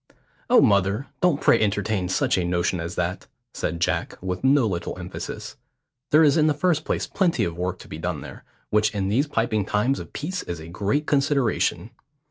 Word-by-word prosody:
"Oh, -, -, +7 dB
mother, 100 Hz, +4 st, +2 dB, 0.2 s
don't 175 Hz, -5 st, +3 dB
pray 115 Hz, -, +4 dB
entertain 100 Hz, -2 st, 0 dB
such 95 Hz, -, +1 dB
a 90 Hz, -, 0 dB
notion 85 Hz, +1 st, 0 dB
as 85 Hz, +1 st, -5 dB
that," 90 Hz, +1 st, -2 dB, 0.3 s
said 85 Hz, +1 st, -3 dB
Jack, 85 Hz, -, -1 dB
with 90 Hz, +2 st, -4 dB
no 135 Hz, -1 st, +4 dB
little 90 Hz, -5 st, -3 dB
emphasis. 90 Hz, 0 st, -7 dB, 0.5 s
"There 155 Hz, +2 st, +6 dB
is 150 Hz, +1 st, +4 dB
in 155 Hz, -1 st, +4 dB
the 150 Hz, -, +2 dB
first 160 Hz, 0 st, +1 dB
place -, -, -1 dB
plenty 180 Hz, -3 st, +1 dB
of 85 Hz, -1 st, -2 dB
work 90 Hz, +1 st, -2 dB
to -, -, -13 dB
be -, -, -8 dB
done -, -, -3 dB
there, -, -, -10 dB, 0.3 s
which 105 Hz, 0 st, +2 dB
in 95 Hz, -1 st, -1 dB
these 135 Hz, +9 st, +2 dB
piping 115 Hz, -6 st, 0 dB
times 110 Hz, +7 st, 0 dB
of -, -, -9 dB
peace 180 Hz, +5 st, -4 dB
is 85 Hz, -1 st, -6 dB
a 80 Hz, -, -9 dB
great 105 Hz, -, -1 dB
consideration. 140 Hz, -5 st, +1 dB
105 Hz, 195 wpm, -24 LUFS, 90-145 Hz, 0.5 s, Oh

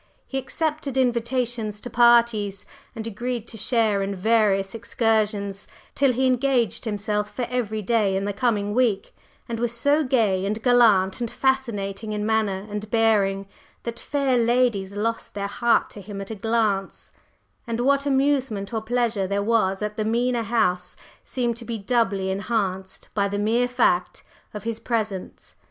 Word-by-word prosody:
He 270 Hz, -, -3 dB
accepted 295 Hz, 0 st, -3 dB
invitations 235 Hz, -3 st, 0 dB
to -, -, -7 dB
parties, 235 Hz, -4 st, +3 dB, 0.3 s
and 220 Hz, -, -5 dB
agreed 235 Hz, +1 st, -4 dB
to -, -, -8 dB
share 220 Hz, -2 st, +1 dB
in 195 Hz, 0 st, -2 dB
various 195 Hz, -1 st, +2 dB
excursions, 215 Hz, -3 st, -1 dB, 0.3 s
till 275 Hz, -2 st, +3 dB
he 260 Hz, +2 st, 0 dB
engaged 255 Hz, -2 st, +1 dB
himself 210 Hz, -1 st, -2 dB
for 250 Hz, -, -2 dB
every 220 Hz, -4 st, -2 dB
day 210 Hz, -3 st, +2 dB
in 195 Hz, -, -2 dB
the 205 Hz, -, -2 dB
coming 205 Hz, -2 st, 0 dB
week, 225 Hz, -5 st, +1 dB, 0.3 s
and 230 Hz, -1 st, -4 dB
was 240 Hz, -1 st, 0 dB
so 285 Hz, +5 st, +3 dB
gay 220 Hz, -8 st, +2 dB
and 210 Hz, +3 st, -1 dB
gallant 225 Hz, -5 st, +4 dB
and 235 Hz, -, -1 dB
fascinating 220 Hz, -6 st, -1 dB
in 210 Hz, 0 st, -2 dB
manner 210 Hz, -3 st, 0 dB
and 210 Hz, 0 st, -5 dB
bearing 205 Hz, -4 st, +2 dB, 0.4 s
that 235 Hz, 0 st, -5 dB
fair 275 Hz, -4 st, +1 dB
ladies 230 Hz, -5 st, +1 dB
lost 225 Hz, +1 st, -2 dB
their 200 Hz, -1 st, -2 dB
hearts 235 Hz, +4 st, +1 dB
to 205 Hz, -, -9 dB
him 200 Hz, +1 st, -7 dB
at 195 Hz, +2 st, -6 dB
a -, -, -4 dB
glance, 210 Hz, -2 st, -1 dB, 0.6 s
and 230 Hz, 0 st, -2 dB
what 280 Hz, +2 st, +2 dB
amusement 265 Hz, -7 st, +1 dB
or 220 Hz, -, -1 dB
pleasure 225 Hz, -3 st, 0 dB
there 200 Hz, +1 st, -1 dB
was 210 Hz, -3 st, +1 dB
at 210 Hz, 0 st, -4 dB
the 215 Hz, -, 0 dB
Mena 240 Hz, +2 st, +1 dB
House 200 Hz, -6 st, 0 dB, 0.3 s
seemed 240 Hz, -3 st, -2 dB
to 235 Hz, -, -7 dB
be 230 Hz, -1 st, -4 dB
doubly 200 Hz, -3 st, 0 dB
enhanced 190 Hz, -2 st, -2 dB
by 200 Hz, -1 st, +1 dB
the 200 Hz, 0 st, -3 dB
mere 230 Hz, +4 st, +2 dB
fact 235 Hz, -8 st, +1 dB, 0.3 s
of 210 Hz, -, -7 dB
his 230 Hz, -1 st, -3 dB
presence. 215 Hz, -5 st, -3 dB
220 Hz, 160 wpm, -24 LUFS, 200-240 Hz, 0.6 s, gallant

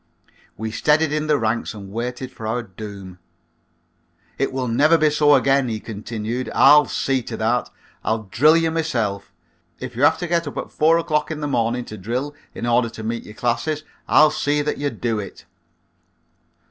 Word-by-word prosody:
We 110 Hz, +1 st, -4 dB
steadied 150 Hz, +5 st, +2 dB
in 155 Hz, 0 st, -1 dB
the 150 Hz, -1 st, +3 dB
ranks 115 Hz, -1 st, -1 dB
and 100 Hz, -2 st, -10 dB
waited 125 Hz, +3 st, -4 dB
for 110 Hz, -, -7 dB
our 120 Hz, +2 st, -1 dB
doom. 100 Hz, -3 st, -10 dB, 1.2 s
"It 135 Hz, -, 0 dB
will 130 Hz, -1 st, -2 dB
never 150 Hz, +8 st, +4 dB
be 155 Hz, -1 st, +3 dB
so 145 Hz, -1 st, +5 dB
again," 135 Hz, -1 st, +2 dB
he 110 Hz, -1 st, -3 dB
continued, 110 Hz, +3 st, -5 dB
"I'll 145 Hz, 0 st, +7 dB
see 135 Hz, -1 st, 0 dB
to 115 Hz, -1 st, -7 dB
that. 120 Hz, +3 st, 0 dB, 0.3 s
I'll 110 Hz, 0 st, -1 dB
drill 150 Hz, +11 st, +4 dB
ye 165 Hz, -1 st, +2 dB
myself. 120 Hz, -14 st, -2 dB, 0.5 s
If 125 Hz, -2 st, -7 dB
you 125 Hz, -, -4 dB
have 145 Hz, -, +5 dB
to 175 Hz, -, -4 dB
get 170 Hz, -1 st, 0 dB
up 145 Hz, -, -6 dB
at -, -, -5 dB
four 160 Hz, +2 st, +3 dB
o'clock 150 Hz, -2 st, 0 dB
in 155 Hz, -1 st, -4 dB
the 150 Hz, -, -2 dB
morning 120 Hz, -2 st, 0 dB
to 110 Hz, -, -9 dB
drill 125 Hz, +9 st, -3 dB, 0.2 s
in -, -, -4 dB
order 120 Hz, 0 st, +2 dB
to 115 Hz, -1 st, -9 dB
meet 115 Hz, +1 st, -3 dB
your 105 Hz, -, -11 dB
classes, 150 Hz, +7 st, -1 dB, 0.2 s
I'll 155 Hz, 0 st, +6 dB
see 145 Hz, 0 st, 0 dB
that 150 Hz, -, -2 dB
ye 145 Hz, 0 st, 0 dB
do 115 Hz, -5 st, -2 dB
it. 100 Hz, -, -9 dB
125 Hz, 185 wpm, -21 LUFS, 110-150 Hz, 1.2 s, I'll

